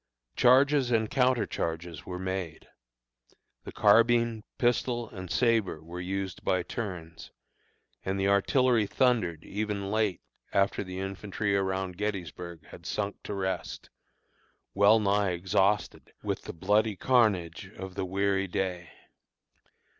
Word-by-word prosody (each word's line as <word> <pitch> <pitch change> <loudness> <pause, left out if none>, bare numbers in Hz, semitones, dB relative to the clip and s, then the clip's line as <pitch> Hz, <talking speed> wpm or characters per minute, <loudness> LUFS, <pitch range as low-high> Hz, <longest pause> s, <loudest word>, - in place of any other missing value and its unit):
Charges 135 +1 +5
and 110 -2 +1
counter 125 -3 +3
charges 80 -2 -4
were 90 - -4
made; 95 -3 -4 1.0
the - - -6
carbine, 115 -1 +4
pistol, 120 -1 +1
and 95 -3 -8
sabre 115 -9 +1
were 85 +2 -7
used 95 +1 -4
by 90 -1 +1
turns, 85 -6 -6 0.7
and 95 +1 -2
the 95 - +1
artillery 115 +3 +3
thundered 105 - +1
even 100 -1 -3
late 105 -4 0 0.3
after 100 0 +2
the 95 -1 -7
infantry 100 +1 -2
around 95 -2 -1
Gettysburg 90 -5 -4
had - - -12
sunk 105 -1 -3
to 105 - -4
rest, 95 -2 -4 0.8
well 100 +3 +6
nigh 100 -2 +2
exhausted 95 +4 0
with - - -3
the - - -5
bloody 105 +5 +1
carnage 100 - +1
of 95 0 -7
the 95 0 -3
weary 95 +1 0
day. 90 -2 -3
100 Hz, 125 wpm, -29 LUFS, 90-110 Hz, 1.0 s, well